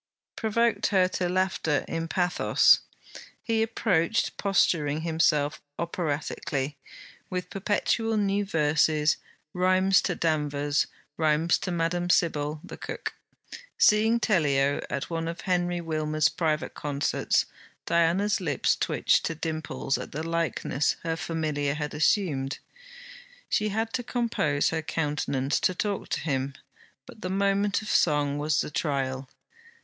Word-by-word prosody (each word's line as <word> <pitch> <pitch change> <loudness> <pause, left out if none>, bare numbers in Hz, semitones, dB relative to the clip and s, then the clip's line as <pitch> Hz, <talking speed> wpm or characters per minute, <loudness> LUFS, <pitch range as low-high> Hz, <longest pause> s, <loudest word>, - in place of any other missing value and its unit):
provoked 230 +1 +1
her 185 -3 +3
to 185 -1 -2
laughter 180 -5 0
in 165 0 -3
pathos. 180 +1 +4 0.6
He 225 -1 +1
approached, 220 -3 +1
posturing 160 -6 +1
himself 160 -3 +1 0.2
operatically, 155 -3 -2 0.6
with 180 -1 -4
perpetual 215 +3 0
new 200 0 +1
verses, 155 -3 +2 0.4
rhymes 185 +1 +3
to 180 - -1
Danvers, 145 -3 0 0.3
rhymes 160 +1 +2
to 185 - -3
Madame 175 +1 -1
Sybille, 155 -3 +1
the - - -9
cook. - - -5 0.6
Seeing 220 +2 +4
Tellio 145 -10 +2
at 140 +4 -4
one 165 0 -2
of 165 0 -5
Henry 175 -1 0
Wilmers' 155 -2 0
private 155 -3 -1
concerts, 145 -1 0 0.4
Diana's 180 +6 +2
lips 150 -7 +1
twitched - - +1
to 165 - -2
dimples 155 -3 -2
at - - -7
the 155 +3 -3
likeness 165 -4 0
her 165 -1 -1
familiar 155 -4 -2
had 150 -1 -4
assumed. 150 -4 +1 0.9
She 210 0 +1
had 225 +2 -2
to 250 - -1
compose 230 - 0
her 160 -1 -2
countenance 145 -3 -1
to 185 - +1
talk 200 +1 -2
to - - -1
him; 135 -3 -2 0.5
but 220 - -14
the 185 - -3
moment 200 +2 +1
of - - -8
song 145 -5 +2
was 150 0 +1
the - - -5
trial. 135 -3 -2
165 Hz, 125 wpm, -27 LUFS, 150-190 Hz, 0.9 s, pathos